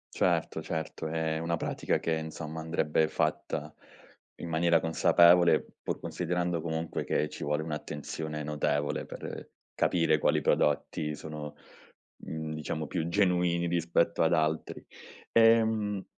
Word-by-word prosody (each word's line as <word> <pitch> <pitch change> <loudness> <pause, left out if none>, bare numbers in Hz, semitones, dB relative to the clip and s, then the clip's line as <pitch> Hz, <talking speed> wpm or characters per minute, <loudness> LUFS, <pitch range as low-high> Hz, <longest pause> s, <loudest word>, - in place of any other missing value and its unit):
Certo, - - +1
certo 80 0 -4
è 80 0 -1
una 85 +1 -1
pratica - - -1
che 85 - -2
insomma 80 0 -5
andrebbe 80 -1 +1
fatta 75 0 -2 0.7
in 85 - -5
maniera 85 +1 +3
consapevole 85 +1 +5 0.2
pur - - -3
considerando 90 -1 -2
comunque 80 0 -3
che 75 - 0
ci - - -8
vuole 75 +1 0
un'attenzione 75 0 -5
notevole 75 -1 -1
per - - -8 0.2
capire 80 -3 +2
quali - - +2
prodotti 75 +1 +1
sono, 75 -1 -7 0.7
mhmm, 80 -1 -5
diciamo 75 0 -4
più 85 -3 -2
genuini 90 -2 +2
rispetto 85 -1 +1
ad 85 +1 +3
altri. 80 0 -1 0.5
Ehm, 110 -3 +3
80 Hz, 120 wpm, -29 LUFS, 75-85 Hz, 0.7 s, consapevole